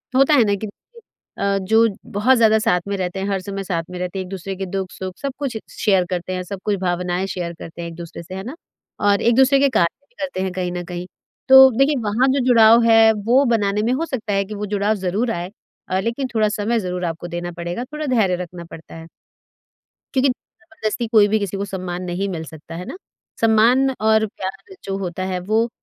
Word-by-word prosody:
होता 275 +3 +5
है 270 -5 +6
ना 205 -2 +1
कि 215 +2 -5
देखिए 465 - -13
अ, 200 0 +2
जो 220 +4 +3 0.2
बहुत 235 +6 +3
ज़्यादा 220 -1 +5
साथ 215 -5 +2
में 200 - -1
रहते 185 0 -3
हैं, 195 - -2
हर 195 -1 0
समय 195 +1 -5
साथ 170 -3 -2
में 180 - -7
रहते 180 +1 -4
हैं, 190 - -4
एक - - -12
दूसरे 195 0 -5
के 195 +1 -4
दुख-सुख 190 -1 -5
सब 275 - -2
कुछ 270 -5 -3 0.2
शेयर 195 -4 +2
करते 180 0 -3
हैं, 185 0 -3
सब 195 +2 -7
कुछ 210 - +1
भावनाएँ 180 0 -1
शेयर 175 -3 -4
करते 165 +1 -9
हैं 170 - -5
एक 165 - -10
दूसरे 170 0 -9
से, 185 +3 -9
है 190 - -5
ना? 255 +8 -7 0.4
और 205 -1 +2
एक 235 0 +3
दूसरे 265 +2 +5
के 280 0 +4
कार्य 170 -9 +1
भी - - -36
करते 275 -10 -3
हैं 190 0 -2
कहीं 180 -1 -2
न 175 0 -4
कहीं। 175 0 -6 0.4
तो 265 0 +10
देखिए, 275 +3 +3
वहाँ 220 +5 +2
जो 280 - +1
जुड़ाव 230 -2 +6
है, 225 -1 +6
वो 230 +6 +2
बनाने 210 -4 +1
में 235 +4 +1
हो 310 +6 -1
सकता 230 -9 -3
है 195 0 +1
कि 210 +2 -7
वो 210 +1 -4
जुड़ाव 205 +2 +1
ज़रूर 220 +7 0
आए 175 -1 -4 0.4
अ, 185 +1 +1
लेकिन 235 +6 -2
थोड़ा 215 -1 +3
समय 225 +2 0
ज़रूर 180 -2 -3
आपको 165 +1 -4
देना 175 +1 -5
पड़ेगा। 175 +6 -5
थोड़ा 300 +3 -6
धैर्य 220 -9 +2
रखना 175 0 -10
पड़ता 165 -1 -12
है। 165 0 -10 1.1
क्योंकि 270 0 +3
ज़बरदस्ती 250 - -5
कोई 215 -2 +5
भी 215 +1 +1
किसी 200 -1 -3
को 200 - -2
सम्मान 185 -2 -5
नहीं 180 +2 -2
मिल 165 -4 -4
सकता, 160 +1 -11
है 180 +2 -6
ना? 360 - -7 0.4
सम्मान 230 +4 +4
और 220 0 +3
प्यार 195 - -8
जो 195 0 -3
होता 185 -1 -4
है, 185 -1 -2
वो 220 +6 0
200 Hz, 230 wpm, -20 LUFS, 180-230 Hz, 1.1 s, तो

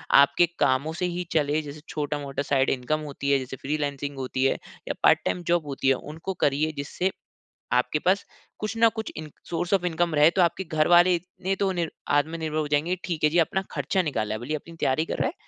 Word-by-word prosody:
आपके 140 +5 +6
कामों 140 +5 +2
से 180 +2 -2
ही 180 0 -2
चले। 150 -1 +2
जैसे 150 0 -9
छोटा-मोटा 145 -2 -3
साइड 135 -1 +2
इनकम 135 +4 0
होती 140 0 -2
है, 140 - +5
जैसे 130 0 -6
फ्रीलांसिंग 145 0 -3
होती 130 0 -2
है 135 - +4 0.3
या - - -1
पार्ट - - +6
टाइम 180 - -1
जॉब 170 -2 +2
होती 135 -1 -2
है, - - +6
उनको 160 +8 -6
करिए, 145 +3 +2
जिससे 160 +7 -1 0.6
आपके 125 +4 +2
पास 185 +5 +1 0.3
कुछ 215 +1 -3
न 230 0 +7
कुछ 220 -1 -4
इन 155 -1 -7 0.2
सोर्स 175 +2 0
ऑफ़ 190 -2 +1
इनकम 170 -1 0
रहे। 150 +2 +6
तो 180 +2 +2
आपके 175 +2 +1
घर 155 -2 +1
वाले 175 +1 +6
इतने 185 +2 -4
तो 195 -1 +2
नि 175 -2 -1 0.2
आत्मनिर्भर 155 +1 0
हो 155 -1 -1
जाएँगे, 150 +5 +1
ठीक 165 -4 -2
है 150 - +5
जी, 170 - +1
अपना 180 +3 +2
ख़र्चा 190 - 0
निकाल 115 -10 -2
रहा 110 - -2
है, 110 - -5
भले 120 - -8
ही - - +1
अपनी 165 +3 -11
तैयारी 135 +4 +2
कर - - -4
रहा - - +1
है, 300 - -6
155 Hz, 230 wpm, -26 LUFS, 140-175 Hz, 0.6 s, न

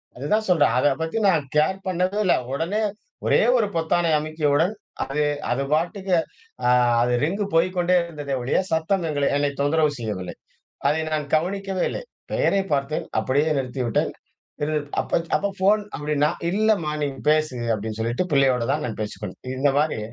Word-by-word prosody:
அதுதான் 210 - 0
சொல்றேன், 160 -5 +4
அத 130 - +2 0.2
பத்தி 160 +6 -2
நான் 165 -5 +2
கேர் 190 +6 +2
பண்ணவே 185 +3 0
இல்ல. 180 - +5 0.2
உடனே 170 +9 -1 0.4
ஒரே - - +4 0.2
ஒரு 220 -3 +2
பொத்தானை 165 +1 +1
அமுக்கியவுடன் 155 +3 +1
அது, 210 - -34 0.7
அது 130 +3 0
பாட்டுக்கு 180 +4 0 0.5
அ - - +4 0.3
அது 120 +1 +2
ரிங்கு 195 +7 -1
போய்க்கொண்டே 180 +1 +3
இருந்ததே 150 -5 -5
ஒழிய, 125 - +1
சத்தம் 165 +3 +1
எங்களை 145 -2 0
என்னை 145 0 +1
தொந்தரவு 150 +1 +2
செய்யவில்லை. 105 -6 -4 0.5
அதை 155 +2 +1
நான் 155 -1 -1
கவனிக்கவே 190 +3 -1
இல்லை. - - -5 0.3
பெயரைப் 195 -1 +1
பார்த்தேன். 140 +2 -1
அப்பிடியே 145 +4 +1
நிறுத்திவிட்டேன். 125 -3 -1 0.5
சிறிது 150 +1 0 0.2
அப்ப - - 0 0.2
அப்பா 200 - -1
ஃபோன் 205 +3 +3
அப்பிடின்னா, 150 0 +1 0.2
இல்லம்மா 200 -6 +1
நீங்க 140 -2 -3
பேசுங்க 155 -6 0
அப்பிடின்னு 110 +1 -5
சொல்லிட்டு, 120 +10 -1
பிள்ளையோட 135 -3 +3
தான் 150 +1 -1
நான் 110 - -5
பேசிக்கொண்டேன். 105 -2 -7
இந்தமாரி. 145 +1 +1
155 Hz, 150 wpm, -23 LUFS, 140-180 Hz, 0.7 s, இல்ல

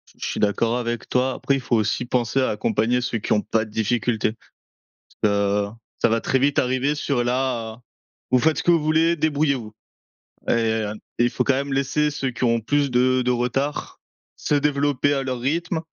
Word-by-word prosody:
Je - - -6
suis - - -3
d'accord 115 +3 +1
avec 120 -1 -4
toi, 130 +1 +1
après 140 - 0
il - - -1
faut 120 - 0
aussi 110 +2 0
penser 120 +1 0
à 130 - +2
accompagner 110 +3 0
ceux 120 -1 -2
qui 110 - 0
ont 105 - +2
pas 110 +1 0
de 110 - -14
difficultés. 110 0 0 0.9
Parce 105 - +3
que 100 0 +1 0.3
ça - - +4
va 115 0 +1
très 130 - +1
vite 140 +2 +1
arriver 130 +3 +1
sur 140 -4 -1
la 120 -2 -2 0.5
«Vous 130 - +5
faites 155 +4 +2
ce - - -1
que - - +3
vous 165 -2 +4
voulez, 160 +2 +2
débrouillez-vous», 145 -7 0 0.8
et - - +4
heu, 110 -2 0 0.2
il 120 0 +3
faut - - -1
quand 140 - +2
même 140 +1 -2
laisser 145 +2 +1
ceux 135 -2 -2
qui 120 - -5
ont 115 -1 +3
plus 145 +3 0
de 130 +1 +3
de 125 - +2
retard 125 +4 -2 0.4
se 150 - -1
développer 145 -1 +1
à 135 -1 -1
leur 130 -2 -3
rythme 160 +6 -1
125 Hz, 200 wpm, -23 LUFS, 115-140 Hz, 0.9 s, Vous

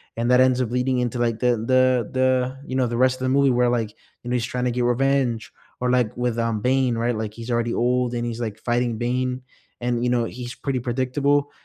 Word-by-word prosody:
and 120 +2 0
that 125 - +6
ends 130 0 +4
up 120 -2 -2
leading 125 +1 0
into, 125 0 -2
like, 115 -2 0
the 125 -2 +2
the 130 0 +2
the 130 0 +1
you 130 - -5
know, 130 -1 +2
the 120 - -3
rest 130 +1 +3
of 130 - -2
the - - +1
movie 140 +1 +4
where, 125 -1 +3
like, 115 -3 0 0.3
you 120 - -6
know, - - -1
he's 120 -2 0
trying 125 0 -3
to 125 - +1
get 120 0 0
revenge, 125 -2 +1 0.3
or, 125 0 +1
like, 125 -4 +1
with, 120 -1 -1
um, 115 -2 -1
Bane, 125 0 +1
right? 120 0 0
Like, 110 -1 -4
he's 115 +2 -7
already 120 0 0
old 125 0 +1
and 120 0 -2
he's, 120 -1 -4
like, 110 -3 -4
fighting 120 0 0
Bane 125 +2 -1 0.4
and, 120 -1 -1
you 125 - +1
know, 120 -1 +2
he's 120 +2 -6
pretty 135 -2 -2
predictable, 135 +4 0
125 Hz, 240 wpm, -23 LUFS, 120-130 Hz, 0.4 s, that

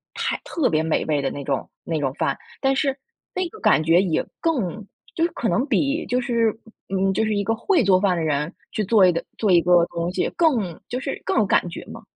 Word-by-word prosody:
太 - - -2
特 290 - 0
别 155 0 +2
美 160 -1 0
味 150 -2 0
的 135 - -1
那 140 - -6
种 - - -2
那 160 -2 -2
种 135 -2 0
饭， - - 0 0.2
但 270 0 +2
是 275 -1 0 0.4
那 370 -1 0
个 435 - -13
感 155 - +3
觉 165 +3 +4
也 175 -5 0 0.2
更 235 - -1 0.3
就 330 - -1
是 340 - +1
可 235 - -2
能 250 - +2
比 290 +3 +1
就 250 - +1
是 235 -4 +1 0.4
嗯 195 0 +1
嗯， - - +1
就 220 - +1
是 215 -1 0
一 200 - 0
个 225 - 0
会 325 - +2
做 185 -2 +4
饭 185 -4 +2
的 165 - -1
人， 150 +2 -1 0.2
去 215 - -1
做 210 -1 +5
一 180 - +5
个 170 - -3
做 210 -4 +1
一 175 - +6
个 175 0 +4
东 170 +1 -2
西， - - 0
更 230 - +1
就 250 - -2
是 275 +1 -5
更 - - 0
有 215 - +4
感 180 - +2
觉 - - -8
嘛。 - - -10
200 Hz, 265 characters per minute, -23 LUFS, 170-255 Hz, 0.4 s, 一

